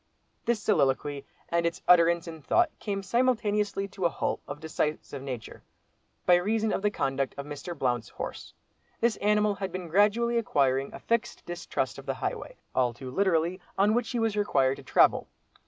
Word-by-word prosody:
This 235 -2 +1
soliloquy, 145 -7 +1 0.2
and 170 0 +1
its 170 0 -2
utterance 170 -1 +5
in 160 -1 -8
thought 345 - +2
came 200 -2 -3
simultaneously 210 -3 +1
to 190 -2 -4
a - - +5
halt - - -2
of 145 - -5
a - - -22
decisive 155 -3 -2
nature, 125 -5 -7 0.6
by 175 -1 +6
reason 215 +4 0
of - - -1
the 210 - +2
conduct 135 -7 -1
of 140 - -5
Mr. 150 +4 -6
Blount's 120 -4 -1
horse. - - -7 0.4
This 235 -2 +2
animal 210 0 +2
had 195 -1 -4
been 185 -2 -5
gradually 220 +6 +3
acquiring 135 - +1
a - - -9
fixed 235 0 -1
distrust 175 0 -3
of - - -12
the - - -1
highway—all 125 - -2
too 130 0 -8
literally—on 185 +4 +1
which 240 0 0
he 245 - -2
was 225 -2 +1
required 135 -10 +2
to - - -11
travel. - - +4
180 Hz, 170 wpm, -28 LUFS, 145-210 Hz, 0.6 s, by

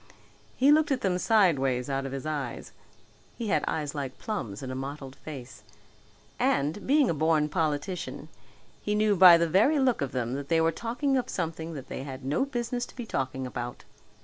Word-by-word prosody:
He 275 +3 +5
looked 305 0 +4
at 265 - +1
them 185 -2 0
sideways 140 - +2
out 135 -1 -2
of - - -7
his 135 +1 -5
eyes 145 -5 -4 0.7
he 225 -3 -3
had - - +2
eyes 150 -3 -2
like 140 -3 -5
plums 120 - -5
in 130 - -5
a - - -4
mottled 135 0 -6
face 135 -5 -9 0.8
and, 205 - 0
being 285 0 +4
a - - +1
born 155 0 +2
politician, 160 +2 -2 0.5
he 210 - -1
knew 210 -1 +3
by 180 -2 +9
the 170 0 +1
very 205 - +4
look 260 - +2
of 140 -2 -2
them 125 -1 -2
that 140 +1 -4
they 165 -1 +3
were 165 0 +3
talking 255 - -1
of 255 - -2
something 165 -1 -4
that 135 - -8
they - - -5
had 135 -1 -8
no 145 - +1
business 245 -2 -3
to - - -16
be 245 - -6
talking 130 -7 -3
about. 120 -1 -6
160 Hz, 195 wpm, -28 LUFS, 135-215 Hz, 0.8 s, by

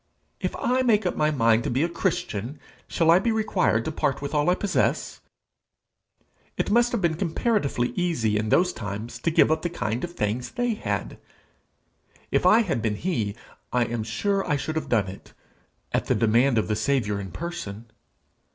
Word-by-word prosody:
If - - -3
I 255 +1 +1
make 220 -5 +3
up 180 - 0
my 150 0 +2
mind 115 -5 +3
to - - -2
be 130 +5 +1
a - - +2
Christian, 145 - -3 0.3
shall 165 -1 +3
I 175 - +6
be 230 +3 0
required 195 - +1
to - - -2
part 140 -3 -1
with 140 +1 -5
all 150 +3 +2
I 180 - +4
possess? 200 0 -1 1.4
It - - -1
must 240 +2 +4
have 235 - -1
been 170 -2 +3
comparatively 165 - 0
easy 160 - 0
in 105 +1 0
those 180 - +3
times 110 +1 -6
to - - 0
give 160 - +4
up 155 0 +1
the 175 - -2
kind 120 -8 -3
of 175 0 -4
things 110 +2 -2
they 245 -2 0
had! 215 - -4 1.1
If - - +3
I 225 - +6
had 175 - -1
been 110 -2 0
he, 110 - -2 0.4
I 125 -1 +2
am 115 0 -3
sure 195 - -1
I 150 - +3
should 150 +3 -3
have 160 - -3
done 110 -4 +2
it 95 +1 -11 0.6
at - - 0
the - - +2
demand 115 +3 +3
of 110 - +1
the 105 - 0
Saviour 110 -3 0
in 95 -2 -7
person. 115 -10 -6
145 Hz, 190 wpm, -25 LUFS, 110-180 Hz, 1.4 s, I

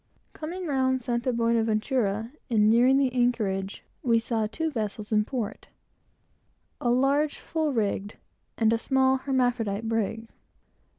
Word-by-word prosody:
Coming 350 +4 -6
round 260 -4 +1
St. 235 -1 -1 0.2
Buenaventura, 225 -1 0 0.2
and 215 -2 +4
nearing 250 +4 +5
the 265 -2 +1
anchorage, 210 -6 0 0.2
we 235 -2 +3
saw 225 -1 -1
two 320 +9 -3
vessels 215 -3 -4
in 210 -1 +3
port, 235 -4 -4 1.1
a 240 - 0
large 275 +4 +2
full 315 -2 -2
rigged, 205 -3 -2 0.4
and 225 -1 +3
a 230 - +1
small 265 +1 +2
hermaphrodite 245 -5 0
brig. 225 0 -2
235 Hz, 125 wpm, -27 LUFS, 220-265 Hz, 1.1 s, nearing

